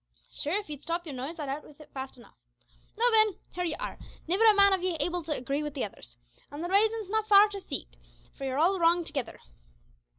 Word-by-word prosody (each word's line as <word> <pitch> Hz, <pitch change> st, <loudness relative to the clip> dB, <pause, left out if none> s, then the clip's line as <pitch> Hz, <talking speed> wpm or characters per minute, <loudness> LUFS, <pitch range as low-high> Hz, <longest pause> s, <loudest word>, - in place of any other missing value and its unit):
"Sure, 300 Hz, -, -2 dB
if 415 Hz, -, -10 dB
ye'd 295 Hz, -2 st, -7 dB
stop 335 Hz, +2 st, -3 dB
your 300 Hz, -, -6 dB
noise 265 Hz, +6 st, -5 dB
I'd 300 Hz, -3 st, -4 dB
out 280 Hz, +3 st, -4 dB
wid 295 Hz, 0 st, -17 dB
it 305 Hz, -, -15 dB
fast 265 Hz, -1 st, -6 dB
enough. 235 Hz, -, -17 dB, 0.6 s
Now, 480 Hz, +2 st, +3 dB
then, 435 Hz, -3 st, +4 dB, 0.2 s
here 360 Hz, -, -2 dB
ye 330 Hz, -3 st, -1 dB
are, -, -, -6 dB, 0.3 s
nivver 380 Hz, +7 st, +3 dB
a 425 Hz, -, +5 dB
man 400 Hz, -1 st, +6 dB
of 380 Hz, -, +1 dB
ye 365 Hz, -2 st, -1 dB
able 355 Hz, 0 st, -1 dB
to 320 Hz, -1 st, -7 dB
agree 275 Hz, +3 st, -2 dB
wid 295 Hz, -1 st, -5 dB
the 270 Hz, -, -1 dB
others; -, -, -12 dB, 0.3 s
an' 290 Hz, +2 st, -7 dB
the 350 Hz, -, -3 dB
raisin's 435 Hz, +2 st, +2 dB
not 440 Hz, 0 st, 0 dB
far 410 Hz, 0 st, +8 dB
to 400 Hz, -1 st, -7 dB
seek -, -, -4 dB, 0.5 s
for -, -, -9 dB
yer 265 Hz, 0 st, -2 dB
all 360 Hz, +5 st, +3 dB
wrong 340 Hz, +1 st, +4 dB
togither. 280 Hz, -7 st, -5 dB
335 Hz, 235 wpm, -29 LUFS, 285-400 Hz, 0.6 s, far